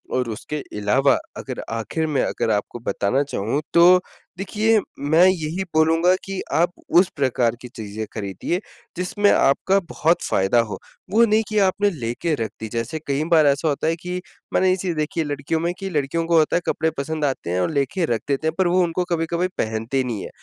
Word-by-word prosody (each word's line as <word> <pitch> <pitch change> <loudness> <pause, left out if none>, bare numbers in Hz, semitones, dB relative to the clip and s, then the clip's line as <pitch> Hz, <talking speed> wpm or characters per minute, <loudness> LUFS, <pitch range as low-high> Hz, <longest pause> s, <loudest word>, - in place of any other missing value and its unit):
और 125 -2 0
उसके 115 +7 -5 0.2
अलावा 130 +7 +3 0.2
अगर - - -6
आखिर 135 +8 -2
में, 145 -4 +1
अगर 110 - -1
आपको 105 +3 -2
बताना 115 +4 0
चाहूँ 135 +1 -2
तो 180 +2 +7 0.4
देखिए 215 +3 +2 0.2
मैं 155 +5 +4
यही 180 0 0
बोलूँगा 165 +3 +4
कि 195 -1 -4
आप 175 +2 +3 0.3
उस 185 - +3
प्रकार 125 -4 +1
की 125 - -8
चीज़ें 110 -2 -6
खरीदिए 100 - -3 0.4
जिसमें 200 +3 +1
आपका 190 +8 +3
बहुत 165 +2 +1
फ़ायदा 95 +5 +2
हो, 105 -5 -1 0.3
वो 230 +3 +5
नहीं 220 0 +2
कि 215 - -2
आपने 200 +1 +2
लेके 140 +2 -2
रख 115 -3 -3
दी। 110 - -5
जैसे 115 +7 -3
कई 140 +2 0
बार 155 -3 +6
ऐसा 140 +3 +2
होता 150 +1 0
है 165 - +2
कि 180 +2 -5 0.3
मैंने 185 - +3
ये 185 - +3
चीज़ 180 -2 -3
देखी 155 +2 -2
है 160 - +1
लड़कियों 145 +2 -2
में 170 +2 -1
कि 195 -1 -4
लड़कियों 155 0 -1
को 165 0 +3
होता 155 - +3
है 175 - -1
कपड़े 160 0 +1
पसंद 155 +2 -2
आते 135 -10 -2
हैं 90 +1 0
और - - +1
लेके 145 +5 0
रख 115 - -2
देते 145 +2 0
हैं 160 - 0
पर 190 -2 +3
वो 180 +1 +3
उनको 175 +1 -1
कभी-कभी 170 +2 0
पहनते 115 +4 -1
नहीं 115 -6 -4
है। - - -7
155 Hz, 205 wpm, -22 LUFS, 125-175 Hz, 0.4 s, तो